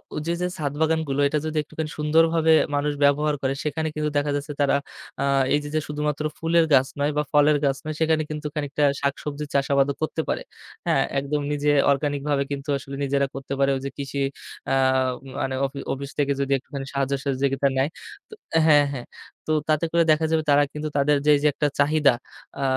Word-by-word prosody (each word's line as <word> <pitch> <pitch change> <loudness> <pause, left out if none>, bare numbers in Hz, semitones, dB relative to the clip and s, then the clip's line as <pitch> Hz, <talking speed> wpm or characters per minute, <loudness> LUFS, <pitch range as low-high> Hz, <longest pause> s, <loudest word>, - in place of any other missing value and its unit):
ওইযে 155 +3 -2
যে 180 - +1
ছাদ 145 -3 -2
বাগানগুলো 160 -3 +1
এটা 150 +2 0
যদি 155 0 -3
একটুখানি 155 +1 -5
সুন্দরভাবে 160 +1 +3 0.2
মানুষ 145 +1 0
ব্যবহার 145 +1 +3
করে 135 0 0
সেখানে 160 +1 -2
কিন্তু 150 0 -1
দেখা 145 0 0
যাচ্ছে 145 +1 -4
তারা 140 0 +3 0.5
আ - - +1 0.3
এইযে 145 0 -2
যে - - +3
শুধুমাত্র 150 0 -2
ফুলের 165 0 +3
গাছ 135 -1 +5
নয় 145 +1 +1
বা 150 - +2
ফলের 150 0 +5
গাছ 135 -1 +1
নয় 155 - -3
সেখানে 160 -1 +2
কিন্তু 150 0 -4
খানিকটা 145 0 -1 0.2
শাকসবজির 145 +1 -3
চাষাবাদও 140 0 +2
করতে 155 +1 -1
পারে। - - -1 0.5
হ্যাঁ? - - +3 0.2
একদম 145 +2 -2
নিজে 145 0 +1 0.2
অর্গানিক 145 0 0
ভাবে 140 -1 +2
কিন্তু 140 +1 -5
আসলে 140 0 -8
নিজেরা 140 0 +1
করতে 135 0 -5
পারে 140 0 +3
যে - - -2
কৃষি 140 0 -4 0.5
আ - - +3 0.7
মানে 130 0 -1
অফি 135 +1 -5
অফিস 140 +1 -6
থেকে 140 -1 +2
যদি 140 0 -2
একটুখানি 135 +1 -7
সাহায্য 140 0 0
সহযোগিতা 135 0 +1
নেয় 135 +2 +2 0.4
ত - - -35 0.3
হ্যাঁ, 145 -2 +6
হ্যাঁ। 125 -3 -6 0.4
তো - - 0 0.2
তাতে 155 +1 +2
করে 170 0 +4
দেখা 155 +1 +2
যাবে 160 -1 +2
তারা 145 0 +5
কিন্তু 150 0 -4
তাদের 145 +1 +3
যে, 150 - +6
যে - - +5
একটা 150 - 0
চাহিদা 145 -1 +4 0.5
আ - - 0
145 Hz, 190 wpm, -24 LUFS, 140-155 Hz, 0.7 s, হ্যাঁ